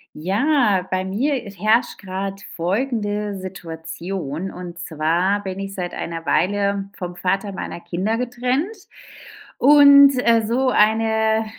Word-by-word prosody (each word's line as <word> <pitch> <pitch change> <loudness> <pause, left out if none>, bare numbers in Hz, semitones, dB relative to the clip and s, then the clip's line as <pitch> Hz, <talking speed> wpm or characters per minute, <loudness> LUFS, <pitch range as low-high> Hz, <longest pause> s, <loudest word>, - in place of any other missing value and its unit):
Ja, 200 - +1
bei 185 0 -1
mir 240 +10 0
i 200 - -8
herrscht 215 +5 +1
grad 195 0 -5
folgende 205 +1 -2
Situation: 170 -1 -6
Und 175 -1 -9
zwar 175 +5 0
bin 190 -1 -5
ich 195 0 -6
seit 180 -2 -4
einer 165 -1 -5
Weile 200 +2 0
vom 180 -1 -6
Vater 195 +3 -1
meiner 185 -2 -6
Kinder 185 +6 -2
getrennt. 250 - -2 0.8
Und, 280 0 +8
äh, 230 -1 +5
so 255 +4 +1
eine 220 0 +2
200 Hz, 125 wpm, -21 LUFS, 180-230 Hz, 0.8 s, Und